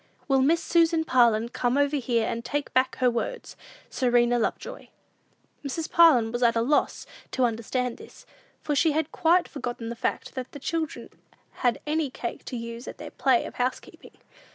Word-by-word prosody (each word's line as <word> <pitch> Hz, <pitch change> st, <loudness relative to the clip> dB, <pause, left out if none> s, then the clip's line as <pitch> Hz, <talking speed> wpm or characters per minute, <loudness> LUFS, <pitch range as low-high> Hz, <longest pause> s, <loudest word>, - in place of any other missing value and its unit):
Will 270 Hz, -2 st, +3 dB
Miss 325 Hz, +5 st, +2 dB
Susan 330 Hz, -1 st, +2 dB
Parlin 235 Hz, -4 st, +3 dB
come 245 Hz, +1 st, 0 dB
over 285 Hz, +1 st, +2 dB
here, 235 Hz, -4 st, 0 dB
and 235 Hz, -, -3 dB
take 290 Hz, +3 st, -3 dB
back 255 Hz, 0 st, +2 dB
her 250 Hz, -1 st, +2 dB
words? 240 Hz, -, -4 dB, 0.4 s
"SERENA 245 Hz, -1 st, +2 dB
LOVEJOY." 225 Hz, -, -4 dB, 0.7 s
Mrs. 310 Hz, +3 st, -4 dB
Parlin 270 Hz, -10 st, +5 dB
was 240 Hz, +1 st, -3 dB
at 235 Hz, -1 st, +3 dB
a 230 Hz, -, +2 dB
loss 290 Hz, +5 st, 0 dB, 0.2 s
to 260 Hz, -, -1 dB
understand 240 Hz, +2 st, -2 dB
this, -, -, -14 dB, 0.4 s
for 300 Hz, -, -1 dB
she 315 Hz, +1 st, +3 dB
had 315 Hz, 0 st, -1 dB
quite 345 Hz, +2 st, +3 dB
forgotten 240 Hz, -4 st, -5 dB
the 235 Hz, -, -5 dB
fact, -, -, -3 dB
that 255 Hz, -2 st, -6 dB
the 285 Hz, -, -8 dB
children 320 Hz, +2 st, -3 dB, 0.5 s
had 245 Hz, -2 st, +2 dB
any 305 Hz, -1 st, 0 dB
cake 240 Hz, -1 st, -6 dB
to 250 Hz, -, -5 dB
use 230 Hz, +1 st, -7 dB
at -, -, -8 dB
their -, -, -9 dB
play 260 Hz, -3 st, +2 dB
of -, -, -8 dB
housekeeping. 255 Hz, +1 st, -5 dB
255 Hz, 175 wpm, -26 LUFS, 235-300 Hz, 0.7 s, Parlin